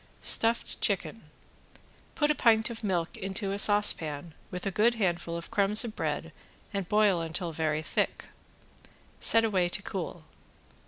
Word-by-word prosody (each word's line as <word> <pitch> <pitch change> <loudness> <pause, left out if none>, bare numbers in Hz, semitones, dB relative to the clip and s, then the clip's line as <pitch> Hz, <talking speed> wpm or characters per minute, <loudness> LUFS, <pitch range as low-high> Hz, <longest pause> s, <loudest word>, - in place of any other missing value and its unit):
~STUFFED 230 +1 +3
CHICKEN~ - - -1 0.9
Put 295 0 +2
a - - +3
pint 230 -4 +3
of 230 -1 -8
milk 180 -5 -1
into 195 +1 -2
a 200 - -2
saucepan 170 -7 +3 0.2
with 180 +1 -6
a 195 - -1
good 225 +6 +2
handful 175 -5 -2
of 170 - -8
crumbs 210 +1 +3
of 225 -1 -7
bread - - -3 0.4
and 195 -3 -3
boil 210 -4 +3
until 165 +1 -4
very 155 -1 -2
thick. - - -2 0.9
Set 225 0 +3
away 185 -5 +1
to 195 - -3
cool. 175 -4 -6
195 Hz, 150 wpm, -28 LUFS, 170-215 Hz, 0.9 s, ~STUFFED